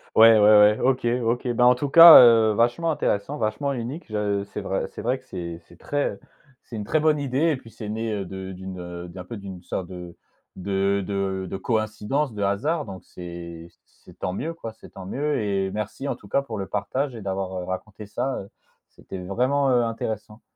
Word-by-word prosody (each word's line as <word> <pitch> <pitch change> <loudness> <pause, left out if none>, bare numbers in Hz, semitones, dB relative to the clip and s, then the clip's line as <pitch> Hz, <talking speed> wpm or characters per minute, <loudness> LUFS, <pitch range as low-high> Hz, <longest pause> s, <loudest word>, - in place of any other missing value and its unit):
Ouais, 115 0 +8
ouais, - - +4
ouais, 105 0 +6
OK, 130 -2 +1 0.2
OK, 120 +2 -1
bah, 125 +1 +3
en 125 - +7
tout 140 +3 -3
cas, 165 +3 +11
heu, 115 -3 +6
vachement 120 +10 +1
intéressant, 145 -2 -1
vachement 110 +6 -1
unique. 130 +6 -5
Je 105 -2 -1
c'est 100 - -7
vrai 95 -1 -2
c'est - - -9
vrai 125 +3 -1
que 130 - -25
c'est 85 -7 -7
c'est - - -17
très 145 0 -2 0.5
c'est 120 - -9
une 105 - -4
très 140 +9 +1
bonne 155 -1 +3
idée 145 +4 +1
et - - +1
puis 115 -4 -13
c'est 105 - -8
né, 110 +1 -3
heu, 100 -2 -3
de 95 +1 -7
d'une, 95 0 -8
heu, 90 0 -7
d'un 90 +1 -9
peu 110 +4 -8
d'une 95 -3 -9
sorte 90 0 -4
de 90 -2 -10 0.4
de 100 +1 0
de 95 -1 -2
de 95 - -4
coïncidence, 110 +6 -1
de 105 -1 -3
hasard, 145 +12 0
donc 95 -3 -10
c'est 85 -1 -9 0.2
c'est - - -20
tant 90 - -3
mieux 155 - -4
quoi, 115 -9 -8
c'est - - -15
tant 95 - -11
mieux 145 +7 -1
et 100 -3 -1
merci, 110 +7 -4
en - - -1
tout 100 - -16
cas, 140 - +1
pour 115 -6 -7
le 95 - -4
partage 125 +7 -2
et 110 - -8
d'avoir, 95 -1 -3
heu, - - -6
raconté 100 +4 -6
ça, 130 +6 -3
heu, 100 - -12 0.4
c'était - - -10
vraiment, 125 +9 0
heu, 120 -1 +3
intéressant. 110 -1 -5
105 Hz, 215 wpm, -24 LUFS, 95-125 Hz, 0.5 s, cas